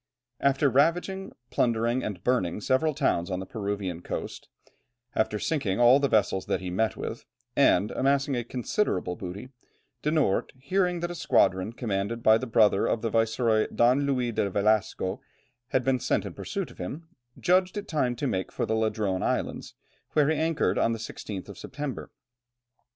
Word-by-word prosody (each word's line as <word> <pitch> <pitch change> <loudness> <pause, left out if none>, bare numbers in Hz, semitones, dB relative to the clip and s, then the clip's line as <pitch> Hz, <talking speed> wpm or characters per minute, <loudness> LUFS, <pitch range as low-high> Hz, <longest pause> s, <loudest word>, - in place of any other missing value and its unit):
After 140 +1 +3
ravaging, 175 - +1 0.2
plundering, 120 +1 +1
and 100 -4 -5
burning 105 -8 +1
several 140 +7 +1
towns 95 - +1
on 90 -1 -2
the 95 - -5
Peruvian 100 -5 -4
coast, - - -6 0.7
after 110 -1 +1
sinking 110 -6 -1
all 120 +3 +7
the 140 - +2
vessels 100 -5 +1
that - - 0
he 90 -1 -5
met 110 +5 0
with, - - -5 0.3
and 100 +4 +4
amassing 140 0 +1
a 120 - -1
considerable 120 - -1
booty, 95 +7 -7 0.5
De 150 - 0
Noort, 150 -11 +1
hearing 180 +5 0
that 175 0 -2
a - - -4
squadron 95 - +2
commanded 115 -1 -3
by 110 +1 +6
the 130 - -4
brother 105 -3 +4
of 115 - -1
the 115 - -1
viceroy, 115 0 +2
Don 130 +4 +3
Luis 125 -4 0
de 100 - 0
Velasco, 100 -1 0 0.5
had 130 -1 +1
been 130 0 +1
sent - - 0
in - - -6
pursuit - - -4
of - - -18
him, 145 - -6 0.3
judged 185 +2 +2
it 205 0 -5
time 130 -7 0
to 130 - -3
make 95 -8 -2
for - - -2
the 110 - -1
Ladrone 110 -4 0
Islands, - - -2 0.4
where 150 -1 +3
he 160 - +2
anchored 155 - +1
on 115 - +2
the - - -3
16th 105 -4 -7
of - - -10
September. 145 -2 -6
115 Hz, 175 wpm, -27 LUFS, 100-140 Hz, 0.7 s, all